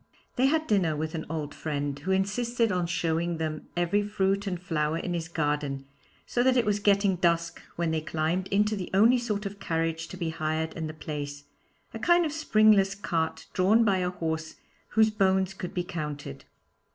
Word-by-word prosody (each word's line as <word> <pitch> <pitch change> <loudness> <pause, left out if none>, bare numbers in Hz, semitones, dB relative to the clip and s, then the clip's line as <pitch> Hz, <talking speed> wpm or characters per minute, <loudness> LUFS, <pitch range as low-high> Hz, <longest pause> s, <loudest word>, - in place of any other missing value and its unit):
They 260 +2 +3
had 315 +2 +1
dinner 185 - +2
with 155 +1 -3
an 160 -2 -4
old 150 -3 -4
friend, 145 -2 -3
who 170 +6 -6
insisted 225 +4 +1
on 180 -2 0
showing 170 0 0
them 155 -1 -4
every 175 +4 +2
fruit 200 -1 0
and 180 -2 -2
flower 160 -3 -1
in 175 +1 -3
his 165 -2 -3
garden, 145 -4 -2 0.4
so 240 - 0
that 255 +1 +4
it 240 - +3
was 205 0 +1
getting 200 -2 +3
dusk 170 -1 +1
when 170 -1 0
they 160 -1 0
climbed 160 +4 -1
into 210 +2 +2
the 185 -3 -5
only 230 +5 +6
sort 210 -3 -2
of 200 0 -6
carriage 165 -1 -1
to 185 - -9
be 170 -2 -2
hired 160 0 -2
in 160 -1 -4
the 155 - -7
place, 145 -2 -5 0.5
a 225 - -5
kind 345 +5 +4
of 310 - -2
springless 215 -9 +4
cart 165 -5 -2
drawn 205 +5 +4
by 195 -3 +3
a 180 -1 0
horse 160 -2 -3 0.3
whose 220 0 +3
bones 190 -2 +2
could 180 -2 -6
be 180 - 0
counted. 150 - -6
180 Hz, 190 wpm, -28 LUFS, 160-205 Hz, 0.5 s, only